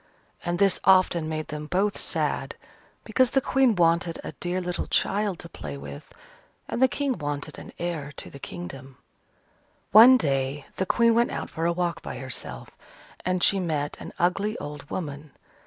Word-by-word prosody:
And 175 0 -1
this 195 0 +3
often 185 -4 +4
made 155 0 -4
them 150 0 -5
both 195 +5 +1
sad, - - -1 0.5
because 255 -1 +3
the 270 - +3
Queen 265 -3 +3
wanted 170 -1 +2
a - - -5
dear 175 +1 -3
little 180 -1 -3
child 205 -2 +1
to 170 - -8
play 70 - -7
with, 70 0 -9 0.6
and 240 - -3
the 260 - +7
King 270 -4 -2
wanted 145 -1 -4
an - - -10
heir 165 -5 -3
to - - -7
the 140 - -10
kingdom. 135 -6 -8 0.9
One 235 +6 +10
day 135 - -1
the 190 - -1
Queen 235 -1 +4
went 235 +1 +3
out - - -5
for 165 +1 -1
a - - +3
walk 170 -1 -1
by - - -6
herself, 125 - -6 0.5
and 185 0 0
she 200 - +4
met 155 -5 -1
an - - -8
ugly 195 +5 +1
old 145 -1 -8
woman. 145 -4 -5
170 Hz, 170 wpm, -26 LUFS, 145-195 Hz, 0.9 s, One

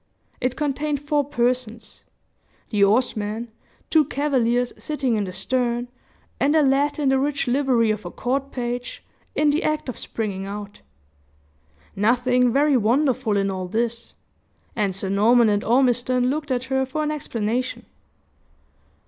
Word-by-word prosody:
It 255 0 -1
contained 295 0 -1
four 290 0 0
persons 245 -4 -2 0.7
the 205 -3 +3
oarsman, 220 +1 +1 0.4
two 315 -1 +5
cavaliers 250 -4 0
sitting 275 -6 -1
in 210 -2 0
the 185 - -6
stern, 240 +5 -1 0.5
and 290 +3 +2
a 310 - +5
lad 280 +2 +2
in 290 -3 +1
the 265 0 +3
rich 280 0 -1
livery 245 -4 +2
of 215 0 -3
a 175 - -6
court 270 +7 -2
page 245 0 -4 0.3
in 300 -1 +3
the 300 - 0
act 305 -3 -1
of 255 - -5
springing 195 -3 -4
out. 205 0 -7 1.1
Nothing 245 +4 +2
very 285 +2 +3
wonderful 250 -1 +2
in 195 0 +1
all 185 -1 -4
this; 230 +3 -2 0.6
and 200 -4 0
Sir 195 0 -4
Norman 220 +4 +4
and 205 0 +1
Ormiston 250 +1 +2
looked 295 0 -3
at 250 -1 0
her 265 0 0
for 295 +4 -3
an 300 - -1
explanation. 250 -4 -3
250 Hz, 145 wpm, -23 LUFS, 220-275 Hz, 1.1 s, two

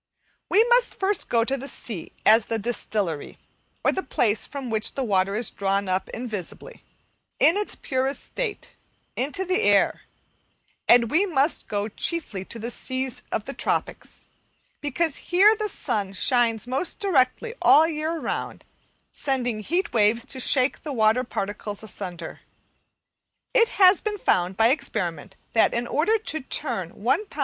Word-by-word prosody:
We 435 - +5
must 485 +1 +2
first 390 +1 0
go 230 -1 +3
to 270 - 0
the 275 +1 -7
sea 215 - -5
as 220 +1 +5
the 225 - -1
distillery, 205 -7 -2 0.5
or - - +4
the 380 - -2
place 215 - 0
from 275 -4 -6
which 215 -1 0
water 200 -6 +1
is 225 0 -1
drawn 195 0 -1
up 185 +1 -1
invisibly, 230 - -7 0.6
in 330 - +6
its 415 0 -1
purest 265 0 -2
state, 455 -5 -5 0.4
into 290 +9 -2
the 370 +4 +1
air; - - +3 0.9
and 235 -1 +5
we 375 +6 +3
must 295 -2 +1
go 205 0 -2
chiefly 225 - -3
to 235 - -6
the 230 +2 -5
seas 260 +1 -3
of - - -2
the - - -6
tropics, - - -3 0.6
because 310 +1 -1
here 395 +5 +4
the 425 -1 -3
sun 200 - -2
shines 230 +2 +2
most 265 +8 -1
directly 385 - +1
all 310 - +7
the 325 0 0
year 310 +2 -2
round, - - -4 0.5
sending 250 -5 -1
heat 345 - -1
waves 225 +1 +2
to 270 -1 -5
shake 255 +1 +2
the 300 - -6
water 220 +1 +3
particles 205 -2 -5
asunder. 175 -5 -7 1.1
It 465 -2 +4
has 375 -1 +6
been 425 -1 -3
found 185 - +1
by 225 +1 +5
experiment 185 - -2 0.2
that, 225 - +3
in 235 +1 -1
order 340 - +2
to 315 -7 -3
turn 240 - -2
1 265 - 0
lb. 310 - -12
255 Hz, 155 wpm, -24 LUFS, 215-330 Hz, 1.1 s, all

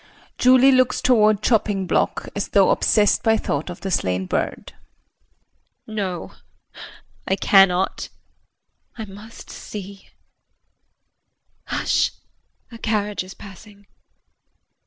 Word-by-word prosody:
JULIE 255 +1 +6
[Looks 255 -1 +2
toward 215 -4 +3
chopping 210 -4 +1
block - - -1
as 200 - -2
though 195 -2 +3
obsessed 210 -2 +2
by 225 -1 +2
thought 145 -4 -3
of 175 - -9
the 195 - -4
slain 95 - -1
bird]. - - -4 1.1
No, 195 -5 -5 1.0
I 190 - +1
cannot. 195 -2 +3 0.9
I 220 - -5
must 210 +3 -13
see 200 -1 -10 1.6
hush, - - 0 0.6
a 230 - -11
carriage 210 -3 -2
is 185 +1 -12
passing. 200 +1 -14
205 Hz, 100 wpm, -21 LUFS, 190-220 Hz, 1.6 s, JULIE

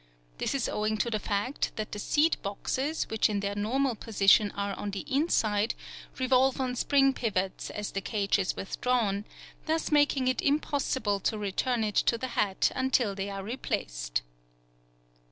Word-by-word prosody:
This - - -1
is 270 - 0
owing 215 +1 -1
to 235 +2 0
the 215 - 0
fact 210 +7 -2
that 215 -1 -4
the 210 - -5
seed 310 +9 +2
boxes, 260 +9 -2
which 220 0 +2
in 205 -1 0
their 200 0 -2
normal 245 +6 0
position 205 -1 +4
are 200 0 -2
on 205 - -4
the 195 -1 -4
inside, 230 -7 +1 0.4
revolve 260 0 +3
on 255 -1 -1
spring 275 +1 +3
pivots 195 -7 -2
as 210 -1 -5
the 195 - -3
cage 200 -1 0
is 185 - -1
withdrawn, 210 -2 -1 0.4
thus 320 +1 0
making 290 -3 +3
it 255 - +1
impossible 270 -7 0
to 215 - -1
return 220 +4 0
it 210 -1 -1
to 235 - +3
the 260 +2 -4
hat 200 -5 +1
until 260 -5 +1
they 195 +1 -4
are 195 -1 -5
replaced. - - -3
220 Hz, 165 wpm, -29 LUFS, 200-260 Hz, 0.4 s, position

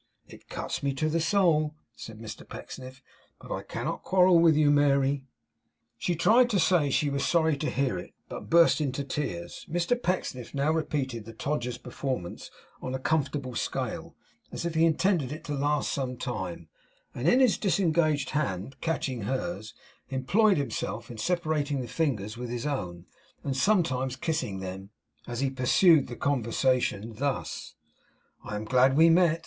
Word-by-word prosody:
It - - -15
cuts - - -4
me 140 -1 -1
to 155 +3 0
the 165 +2 +1
soul,' 160 -4 +2 0.2
said 110 -1 -9
Mr 110 -1 -8
Pecksniff; 130 0 -9 0.4
'but - - -6
I - - -3
cannot - - -4
quarrel 180 -2 +5
with 165 -2 +5
you, 150 -1 +4
Mary.' 140 -1 +2 0.7
She 175 - 0
tried 230 +9 +5
to 205 -5 +2
say 170 -5 +3
she 145 +1 +1
was 140 0 -1
sorry 160 +2 +3
to 150 +2 -2
hear 130 -9 0
it, - - -11
but - - -8
burst 170 -1 +5
into 140 -1 -1
tears. 110 -12 -4
Mr 175 +9 0
Pecksniff 145 - -2
now 140 +3 +2
repeated 135 -8 -2
the 115 - -9
Todgers 125 0 -2
performance 130 -11 -5 0.3
on 130 - -3
a - - -3
comfortable 140 -3 -1
scale, - - -3 0.4
as - - -5
if 170 - -1
he 160 0 +4
intended 165 -3 +2
it 155 - -7
to 150 - -4
last 145 +1 0
some 130 -2 -3
time; 95 -9 -5 0.5
and 130 +7 +1
in 250 - +5
his 255 -5 +4
disengaged 165 -7 +1
hand, 135 -4 -2
catching 140 -7 -2
hers, 130 -2 -3 0.3
employed 185 - +3
himself 120 -5 -3
in 115 - -9
separating 155 -2 0
the 125 - -4
fingers 115 -11 -1
with 125 0 -5
his 120 +1 -4
own, 90 -12 -3 0.4
and 135 - -2
sometimes 130 -7 +1
kissing 130 - -2
them, 95 +1 -7 0.4
as 120 +1 -3
he 135 -1 +1
pursued 140 +5 +4
the 120 - -7
conversation 125 -4 0
thus: 140 +1 -3 0.7
'I 105 - -5
am 105 +1 -4
glad 130 +3 +4
we 165 +1 +7
met. 165 -1 +4
140 Hz, 165 wpm, -28 LUFS, 125-160 Hz, 0.7 s, we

